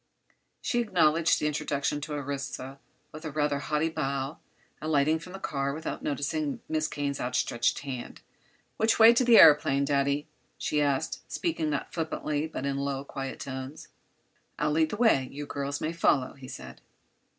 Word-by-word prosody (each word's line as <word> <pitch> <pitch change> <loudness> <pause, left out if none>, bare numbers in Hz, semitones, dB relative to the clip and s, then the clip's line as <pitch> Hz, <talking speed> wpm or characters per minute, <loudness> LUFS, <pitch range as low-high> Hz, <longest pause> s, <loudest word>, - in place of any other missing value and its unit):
She 240 - +1
acknowledged 165 -7 +3
the - - -2
introduction 145 -1 -1
to 150 +1 -5
Orissa 135 -1 -5 0.3
with 155 +1 -10
a 160 - -4
rather 145 -1 0
haughty 150 +2 0
bow, 140 -1 -3 0.4
alighting 155 0 +2
from 180 +3 -11
the - - -5
car 140 -5 -2
without 160 - -5
noticing 145 +1 -2
Miss 155 -1 0
Kane's 140 -1 -3
outstretched 120 -1 0
hand. 130 -4 -7 0.6
"Which 220 +1 +3
way 225 0 +9
is 235 - +3
the 245 -2 +5
aëroplane, 145 -5 +7
Daddy?" 140 +1 +1 0.3
she 150 - 0
asked, 140 -2 0
speaking 310 - -1
not 145 -2 -3
flippantly, 155 -2 -2
but 145 -3 -5
in 140 -1 -1
low, 140 0 -2
quiet 135 -1 -6
tones. 130 +1 -7 0.7
"I'll 150 0 +1
lead 160 +1 +2
the 210 - -4
way; 215 - +3
you 145 +1 -6
girls 140 0 -3
may 160 - -2
follow," 140 -6 +2
he 135 -1 -12
said. - - -9
145 Hz, 160 wpm, -28 LUFS, 140-155 Hz, 0.7 s, way